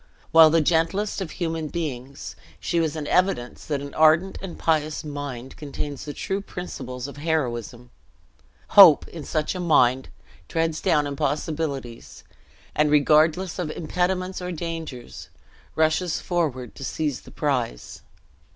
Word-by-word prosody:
While 160 -1 +8
the 165 +1 +3
gentlest 175 +7 +1
of 185 - -3
human 165 -3 -3
beings, 140 -5 -5 0.2
she 170 - -1
was 160 -2 0
an 155 -2 -4
evidence 180 -9 0
that 145 -3 -2
an 140 0 -8
ardent 160 +4 +4
and 190 -3 -7
pious 155 -1 0
mind 145 -4 -6
contains 145 -1 -6
the 145 - -5
true 195 +1 -2
principles 130 -10 -6
of 140 - -10
heroism. 125 -6 -2 0.8
Hope, 185 -7 +8
in 165 -3 -8
such 155 +1 -1
a 185 - -5
mind, 130 -7 +3 0.4
treads 165 -1 -1
down 150 -2 +2
impossibilities; 140 -3 -3 0.5
and, 150 0 +2
regardless 155 +5 +3
of 175 -4 -2
impediments 180 +4 -2
or 180 0 -4
dangers, 165 -7 -6 0.5
rushes 160 +2 +1
forward 145 - -2
to 135 - -9
seize 145 0 -2
the - - -14
prize. - - -3
155 Hz, 135 wpm, -24 LUFS, 140-170 Hz, 0.8 s, While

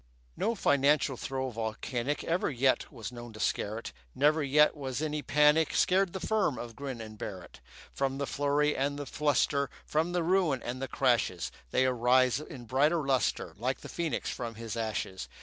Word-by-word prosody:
No 230 - 0
financial 145 -5 +3
throe 130 +1 -3
volcanic 120 +4 -3
Ever 170 +2 0
yet 130 -1 +1
was 115 +1 -7
known 120 -1 -9
to 110 - -11
scare 105 0 -1
it; 115 - -7 0.2
Never 150 +3 +3
yet 150 +2 +4
was 135 -3 -4
any 150 -1 -2
panic 150 +2 +3
Scared 185 0 +3
the 190 - -3
firm 205 - +1
of 120 -1 -7
Grin 135 -2 -5
and 110 -1 -9
Barrett. 95 -4 -7 0.3
From 135 -1 -1
the 140 - -1
flurry 145 +1 +1
and 140 +2 -1
the 145 - -5
fluster, 140 -1 +1 0.2
From 160 +3 0
the 175 -1 0
ruin 170 -6 +2
and 125 +2 -4
the 135 - -2
crashes, 120 -9 +1 0.2
They 130 - +2
arise 125 +1 +3
in 130 -5 -9
brighter 150 +6 +2
lustre, 135 -2 0
Like 130 +3 -1
the - - -9
phoenix 170 -3 -2
from 115 -3 -5
his 115 -1 -6
ashes. 110 -4 -3
135 Hz, 180 wpm, -30 LUFS, 120-150 Hz, 0.3 s, yet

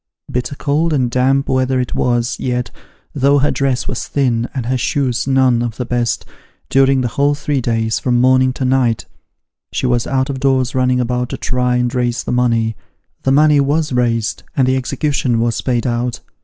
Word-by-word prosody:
Bitter 125 +2 -2
cold 155 +4 0
and 125 -4 +1
damp 135 +2 +2
weather 130 0 +1
it 125 - -2
was, 120 0 0
yet, 125 -1 -2 0.4
though 140 0 +3
her 145 +1 +2
dress 135 -3 -1
was 125 - -4
thin, 120 -4 0
and 130 -4 -4
her 130 +2 0
shoes 130 0 -1
none 130 -3 +3
of 120 -2 -3
the 125 - -3
best, 120 -1 -1 0.4
during 135 0 +3
the 125 - 0
whole 140 +5 +1
three 145 -2 -2
days, 115 -1 0
from 120 -2 +1
morning 130 +1 +4
to 130 - -3
night, 125 -3 +1 0.7
she - - -2
was 120 -2 +1
out 130 0 0
of 135 - -5
doors 130 -2 +1
running 125 -1 +1
about 125 0 -1
to - - -4
try 125 -1 0
and 125 -1 0
raise 120 -1 -1
the - - -4
money. 115 -3 +1 0.5
The 135 - +1
money 150 +1 +5
was 145 +1 0
raised 115 -2 0 0.2
and 130 -2 +3
the 130 - +2
execution 130 -2 -1
was 115 0 0
paid 120 -3 -1
out. 120 0 -2
125 Hz, 190 wpm, -17 LUFS, 120-135 Hz, 0.7 s, money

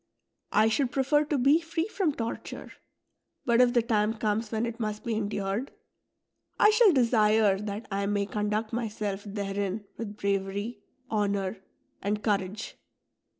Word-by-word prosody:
1 215 +1 +4
should 250 +2 +1
prefer 275 +3 +3
to 295 -1 -1
be 280 +6 +4
free 325 0 -2
from 385 -6 0
torture; 230 -5 -5 0.7
but 235 0 +4
if 245 -1 +4
the 240 -2 +3
time 220 -1 +1
comes 215 0 -1
when 220 +1 0
it 230 0 -5
must 215 -2 -3
be 235 -3 -1
endured, 205 +3 -2 0.9
I 425 - +7
shall 435 -2 +6
desire 220 - +4
that 210 +1 -5
I 200 0 -1
may 205 0 +1
conduct 210 +2 -2
myself 210 -3 -3
therein 200 0 -3
with 210 -2 -6
braver}', 200 +2 -1 0.4
honour, 200 -2 0 0.4
and 210 +2 -1
courage. 205 0 -2
215 Hz, 145 wpm, -28 LUFS, 205-240 Hz, 0.9 s, I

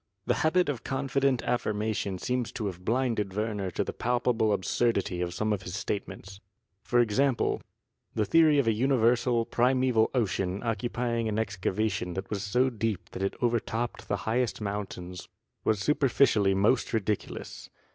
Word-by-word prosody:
The - - +2
habit 175 +3 +3
of 130 -5 -3
confident 135 -1 0
affirmation 105 -4 -1
seems 125 +4 -2
to 115 -4 -3
have 90 -2 -5
blinded 115 -4 0
Werner 105 -3 -1
to 90 - -1
the - - -5
palpable 120 -2 +1
absurdity 100 -2 0
of 90 -1 -1
some 105 +5 0
of 100 - -2
his 90 0 -6
statements. 100 -1 -5 0.4
For 120 - +1
example, 120 +3 +1 0.5
the 105 - +1
theory 155 +6 +5
of 140 - +3
a 115 - +3
universal, 120 -1 +2
primeval 125 -2 +2
ocean 95 -4 0
occupying 115 0 -1
an 105 - -2
excavation 100 -2 -1
that 95 +2 -5
was 100 -2 -2
so 125 +6 +1
deep 110 -4 -3
that - - -6
it 95 - -1
overtopped 120 0 -1
the 100 - 0
highest 120 +2 0
mountains 95 -3 -5 0.4
was 110 - +2
superficially 115 -5 +3
most 105 +7 +2
ridiculous. 105 -2 -3
110 Hz, 150 wpm, -28 LUFS, 100-125 Hz, 0.5 s, theory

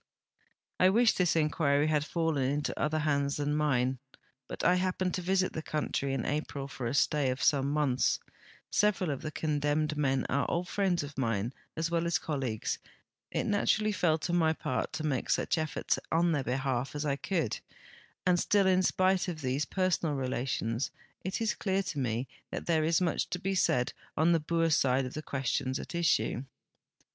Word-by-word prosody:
I 185 - +6
wish 230 +4 +4
this 180 -3 +2
inquiry 150 -2 +2
had 155 -2 +2
fallen 160 -2 0
into 145 +1 -2
other 155 +1 +1
hands 140 -2 +1
than 145 0 0
mine, 130 -4 +1 0.5
l)ut - - -5
1 180 0 +4
hapi)ened 185 0 0
to 185 - -2
visit 185 +1 +1
the 160 - -3
country 150 -3 -2
in 135 -3 -2
April 145 -2 -3
for 130 -3 -5
a 120 - -2
stay 145 -1 +2
of 130 +1 -2
some 140 -1 +3
months; 145 -4 +1 0.5
several 195 -5 +2
of 140 - -4
the 155 - -4
condemned 150 0 0
men 135 -3 +1
are 140 +2 0
old 175 +1 -1
friends 185 -5 +1
of 145 -1 -7
mine 115 -1 -1 0.2
as 165 +1 -1
well 170 0 +1
as 170 - +2
colleagues, 130 -8 -2 0.5
it - - -1
naturall}' 210 +1 +2
fell 165 -5 +2
to 170 +2 -3
my 160 -2 +3
part 125 -6 -2
to 160 -1 -3
make 135 -4 -1
such - - +2
efforts 155 -1 -1
in 170 +1 +3
their 145 -4 0
behalf 130 +1 -1
as 145 +1 -2
1 140 -1 0
could, 165 - -1 0.7
and 180 -1 +4
still 200 +1 +3
in 185 0 +4
spite 185 0 +2
of 165 -3 -4
these 130 +2 0
per 185 -1 0
sonal 160 -4 0
relations 125 -2 -1 0.3
it 185 +1 -3
is 225 -2 +1
clear 195 -1 0
to 155 -5 -4
me 120 0 -1 0.2
that - - -5
there 160 -2 +2
is 165 +2 +2
much 175 -2 0
to - - -2
be 195 +2 -2
said 125 -9 +2 0.2
on 160 +3 +4
the 165 - +4
Boer 165 +1 +1
side 135 -3 +3
of 125 - -6
the 155 - -4
questions 130 -2 -1
at - - -7
issue. 170 -6 +1
150 Hz, 190 wpm, -30 LUFS, 135-175 Hz, 0.7 s, I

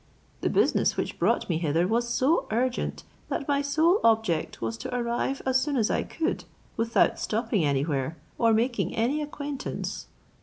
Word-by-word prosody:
The - - 0
business - - +2
which - - -3
brought - - +2
me 165 -3 0
hither 165 +2 +1
was 235 +3 +1
so 270 +3 +2
urgent, 245 +3 -1 0.3
that 275 - -3
my 285 -1 +2
sole 315 +7 +3
objets 220 -8 +2
was 115 0 -2
to 250 - -5
arrive 240 +3 -1
as 260 0 +3
soon 285 0 -1
as 220 -3 +2
I - - +1
could, 330 +3 -2 0.3
without 230 0 +2
stopping 220 -4 0
anywhere, 140 +1 0 0.2
or 230 -1 +4
making 235 +3 +1
any 255 +7 +1
acquaintance. 290 -1 -5
235 Hz, 160 wpm, -27 LUFS, 190-275 Hz, 0.3 s, or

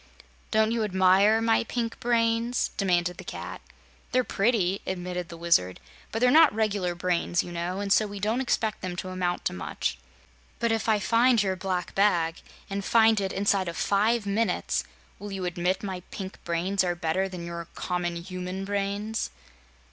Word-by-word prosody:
"Don't 220 0 +3
you 230 -1 0
admire 195 +2 +4
my 225 0 +3
pink 230 0 -3
brains?" 235 0 +1
demanded 180 -2 +1
the - - -7
Cat. - - -7 0.5
"They're 255 0 +3
pretty," 200 -4 +1
admitted 180 -1 -3
the 170 - -9
Wizard, 165 - +2 0.3
"but - - -3
they're 250 +2 +4
not 315 +1 +7
regular 200 -5 0
brains, 175 0 0
you 175 - -8
know, 175 +2 -3
and 200 -1 +2
so 215 - +3
we 205 0 -7
don't 220 +5 0
expect 220 -4 -1
them 180 -1 -4
to 185 +1 -5
amount 180 -1 -2
to - - 0
much." 65 -8 -3 0.6
"But 235 -1 0
if 225 0 0
I 215 - +4
find 230 +2 +3
your 190 -1 0
black 185 -2 -3
bag 175 -5 +2 0.3
and 200 0 -3
find 220 0 +4
it 190 -1 -2
inside 195 -1 +1
of 170 - -4
five 215 +2 +2
minutes 215 +3 0 0.4
will 205 0 -7
you 190 -2 -3
admit 180 +2 -1
my 190 -2 -3
pink 190 -1 -7
brains 180 +3 0
are 175 -1 0
better 175 +3 -1
than 180 -2 -7
your 170 -1 -6
common 175 -1 -2
human 185 +2 -5
brains?" 205 +2 -2
195 Hz, 175 wpm, -27 LUFS, 180-220 Hz, 0.6 s, not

